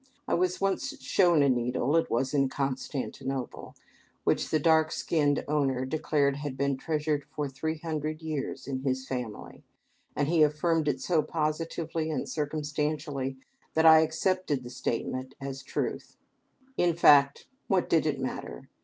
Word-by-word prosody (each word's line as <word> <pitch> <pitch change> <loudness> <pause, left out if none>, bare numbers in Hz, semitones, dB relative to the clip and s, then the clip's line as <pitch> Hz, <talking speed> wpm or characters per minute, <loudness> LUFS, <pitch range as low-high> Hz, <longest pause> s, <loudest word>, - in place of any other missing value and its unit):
I - - 0
was 180 +1 +1
once 275 +9 -1
shown 175 - +3
a - - +4
needle 125 +3 +1
it 165 - +2
was 130 +4 0
in 135 -2 +2
Constantinople 135 -1 -4 0.5
which - - +1
the 155 - +2
dark 160 0 +4
skinned 145 -3 +1
owner 135 -3 +1
declared 140 -1 +1
had 145 -2 -5
been 140 0 +1
treasured 150 0 -1
for 150 0 -4
three 160 +4 -3
hundred 155 -1 -3
years 150 -4 -4
in 135 -2 -2
his 130 -1 -2
family, 125 -5 -6 0.5
and 145 - 0
he 165 0 +3
affirmed 155 +1 +2
it 135 -2 0
so 170 -4 +2
positively 160 +1 -2
and 155 - -2
circumstantially 150 -2 -2 0.4
that 160 0 +3
I 160 0 +9
accepted 160 -2 0
the 120 - -9
statement 130 +2 -3
as 135 0 -6
truth. - - -4 0.6
In 175 -2 +2
fact, 140 -4 +5 0.2
what 190 -2 +2
did 160 -1 +2
it 145 -2 -1
matter? 130 - -5
150 Hz, 150 wpm, -28 LUFS, 135-160 Hz, 0.6 s, I